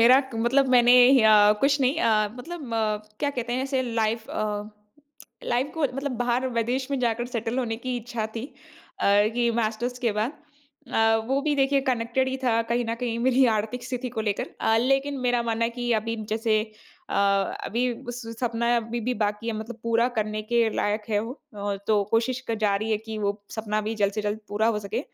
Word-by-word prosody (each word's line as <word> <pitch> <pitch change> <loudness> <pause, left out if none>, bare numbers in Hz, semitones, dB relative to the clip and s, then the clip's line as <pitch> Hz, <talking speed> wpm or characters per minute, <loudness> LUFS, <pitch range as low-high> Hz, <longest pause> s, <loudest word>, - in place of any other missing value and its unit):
मेरा 255 +4 +7
क 265 -3 -10
मतलब 260 +4 +2
मैंने 245 -1 +6 0.3
अ, 210 -1 +7
कुछ 280 +1 +3
नहीं 265 +4 +2
अ, 215 -5 +3
मतलब 285 -2 -7
अ, 215 -1 +1 0.2
क्या 285 - +1
कहते 245 -3 -4
हैं, 255 - 0
ऐसे 265 -1 0
लाइफ़ 225 -2 -1
अ, 210 0 -3 0.7
लाइफ़ 250 +3 0
को 320 - -3
मतलब 275 0 -3
बाहर 245 +2 0
विदेश 250 +4 -1
में 275 - 0
जाकर 240 0 0
सेटल 235 0 -3
होने 230 -3 -1
की 250 +1 -3
इच्छा 230 -1 -4
थी 225 - -3 0.6
अ, - - 0 0.3
कि 240 -1 +2
मास्टर्स 235 +2 -1
के 240 -3 0
बाद। 215 +6 -1 0.6
अ, 225 0 +4
वो 270 +1 +2
भी 300 0 +1
देखिए, 275 0 +3
कनेक्टेड 255 0 0
ही 260 - -2
था 230 -2 +3
कहीं 240 0 +1
न - - 0
कहीं 235 -2 -2
मेरी 260 +1 +4
आर्थिक 225 +4 -4
स्थिति 250 0 -4
को - - +2
लेकर। 200 - -3
अ, 220 - +3
लेकिन 270 +3 +1
मेरा 245 -1 +2
मानना 230 0 0
है 230 - 0
कि 240 0 -2
अभी 230 +1 -3 0.2
जैसे 220 -1 +1 0.5
अ, - - -2 0.5
अभी 245 +3 0 0.2
उस 245 0 -5 0.2
सपना 235 -1 -1
अभी 230 +1 -2
भी 250 - +1
बाकी 210 +2 -2
है, 230 - 0
मतलब 225 +1 -7
पूरा 230 +1 +2
करने 215 0 -1
के 235 +1 +2
लायक 210 +1 0
है 210 - +2
वो। 230 +3 -5 0.2
अ, 205 -1 -3
तो 210 -2 +3
कोशिश 240 +3 +1
कर 230 - +1
जारी 210 -1 +1
रही 225 - -1
है 215 - +1
कि 220 -1 -5
वो 200 -1 0 0.2
सपना 215 -1 -2
भी 220 - -1
जल्द 205 -2 +1
से 215 +1 -3
जल्द 210 +1 -2
पूरा 215 +2 +1
हो 225 -2 +1
सके। 210 +4 -3
235 Hz, 210 wpm, -25 LUFS, 220-250 Hz, 0.7 s, मेरा